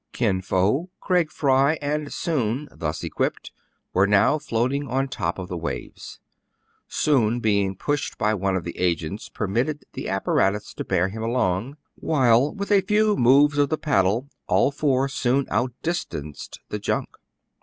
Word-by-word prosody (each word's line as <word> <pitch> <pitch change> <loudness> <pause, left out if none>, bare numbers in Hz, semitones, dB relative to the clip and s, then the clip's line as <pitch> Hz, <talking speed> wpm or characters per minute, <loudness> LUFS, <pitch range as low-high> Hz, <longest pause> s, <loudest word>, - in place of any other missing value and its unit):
Kin 100 -6 +1
Fo, 100 - +1
Craig 180 -4 +1
Fry, 140 +1 +3
and 150 0 -2
Soun, 145 - -1
thus 75 0 -4
equipped, - - -2 0.4
were 95 +2 +4
now 105 +9 +4
floating 140 +1 -1
on 135 +2 0
top 90 -9 -3
of 95 -1 -5
the 90 - -5
waves. 85 0 -6 0.7
Soun, 120 -6 +2
be 105 -3 +2
ing 95 -1 -2
pushed 145 +8 -2
by 105 - +1
one 95 -2 0
of 90 - -2
the 85 - -6
agents, 90 +3 -1
permitted 120 +9 -2
the - - -5
apparatus 95 +1 0
to - - -5
bear 95 0 +1
him 110 +3 -6
along; 115 +2 -1 0.2
while, 130 -2 +3
with 200 0 -5
a 200 -1 +6
few 210 +2 +2
moves 145 +3 +4
of 145 - +3
the 155 - 0
paddle, 115 -3 +1 0.2
all - - +3
four 135 -2 +1
soon 135 0 0
outdistanced 120 - -3
the - - -3
junk. - - -1
125 Hz, 155 wpm, -24 LUFS, 95-145 Hz, 0.7 s, a